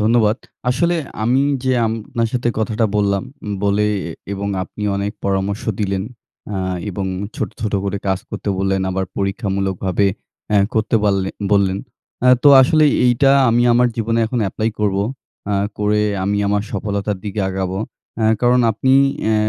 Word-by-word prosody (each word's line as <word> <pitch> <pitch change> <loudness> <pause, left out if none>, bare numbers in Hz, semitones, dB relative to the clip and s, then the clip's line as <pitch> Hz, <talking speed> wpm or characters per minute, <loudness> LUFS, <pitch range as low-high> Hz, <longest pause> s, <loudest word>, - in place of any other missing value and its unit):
ধন্যবাদ। 110 0 +3 0.3
আসলে 170 +7 +1 0.3
আমি 125 +4 +3 0.2
যে 130 - +2
আপনার 115 +1 -2
সাথে 120 -1 0
কথাটা 110 +1 0
বললাম, 100 -2 +1 0.4
বলে 100 +1 +2 0.5
এবং 100 0 -3
আপনি 100 +2 -8
অনেক 100 +1 -2
পরামর্শ 100 +1 -1 0.2
দিলেন। 95 -2 -1 0.5
আ - - -2 0.3
এবং 95 0 -3 0.3
ছোট, - - -2
ছোট 110 -3 -2
করে 100 0 -2
কাজ 95 -1 +1
করতে - - -5
বললেন 95 0 +1
আবার 95 0 -1
পরীক্ষামূলকভাবে 95 -1 -1 0.4
অ্যা 105 - +4 0.2
করতে 110 +1 +2
বাললে 100 -2 +1 0.2
বললেন। 100 -1 +3 0.4
অ্যা 125 - +6
তো - - +9
আসলেই 150 +2 +4
এইটা 125 +3 +4 0.2
আমি 120 +1 +3
আমার 120 +1 +4
জীবনে 115 0 0
এখন 120 +2 -2
এপ্লাই 110 +4 -1
করব। 100 -2 +1 0.5
অ্যা 100 0 0 0.2
করে 105 0 +2 0.2
আমি 100 +1 0
আমার 105 0 +1
সফলতার 100 0 -2
দিকে 105 0 -3
আগাবো। 95 0 -2 0.4
অ্যা 110 - +2
কারণ 125 +1 +4
আপনি 130 +5 +1 0.3
অ্যা 110 - +2
105 Hz, 150 wpm, -19 LUFS, 100-115 Hz, 0.5 s, তো